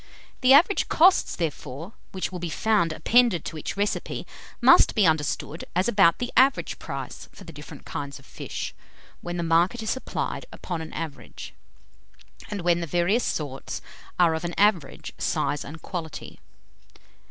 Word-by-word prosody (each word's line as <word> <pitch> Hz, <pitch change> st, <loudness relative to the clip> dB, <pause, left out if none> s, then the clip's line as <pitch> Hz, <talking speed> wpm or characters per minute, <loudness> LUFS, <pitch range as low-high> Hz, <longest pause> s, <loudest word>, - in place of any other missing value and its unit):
The 255 Hz, +1 st, +6 dB
average 345 Hz, +8 st, +5 dB
costs, 365 Hz, +3 st, +4 dB
therefore, 160 Hz, -, -5 dB, 0.2 s
which 190 Hz, -1 st, -3 dB
will 180 Hz, -, -5 dB
be 175 Hz, -1 st, -4 dB
found 205 Hz, -2 st, +1 dB
appended 230 Hz, -1 st, +3 dB
to 160 Hz, -, -5 dB
each 155 Hz, -, -5 dB
recipe, 205 Hz, +1 st, -2 dB, 0.3 s
must -, -, +6 dB
be 215 Hz, -4 st, +4 dB
understood 155 Hz, 0 st, 0 dB
as 185 Hz, +2 st, +2 dB
about 195 Hz, -7 st, +4 dB
the 245 Hz, 0 st, -4 dB
average 270 Hz, +1 st, +3 dB
price -, -, -7 dB
for -, -, -14 dB
the 165 Hz, -, -11 dB
different 150 Hz, 0 st, -11 dB
kinds 140 Hz, -1 st, -5 dB
of 135 Hz, -, -17 dB
fish, -, -, -6 dB, 0.5 s
when 175 Hz, 0 st, -5 dB
the 170 Hz, -, -1 dB
market 170 Hz, +8 st, +2 dB
is 220 Hz, -, -1 dB
supplied 260 Hz, -, -4 dB
upon 175 Hz, -3 st, -5 dB
an 160 Hz, -, -8 dB
average, 160 Hz, -3 st, -7 dB, 1.0 s
and 205 Hz, -2 st, -4 dB
when 175 Hz, 0 st, +2 dB
the 170 Hz, -, -3 dB
various 175 Hz, +9 st, +1 dB
sorts 140 Hz, -4 st, -3 dB, 0.4 s
are 170 Hz, -2 st, +4 dB
of 160 Hz, +1 st, -3 dB
an 175 Hz, 0 st, -4 dB
average 200 Hz, -7 st, +1 dB
size 145 Hz, -, -1 dB
and 160 Hz, +2 st, -10 dB
quality. 165 Hz, -4 st, -6 dB
175 Hz, 160 wpm, -25 LUFS, 160-210 Hz, 1.0 s, The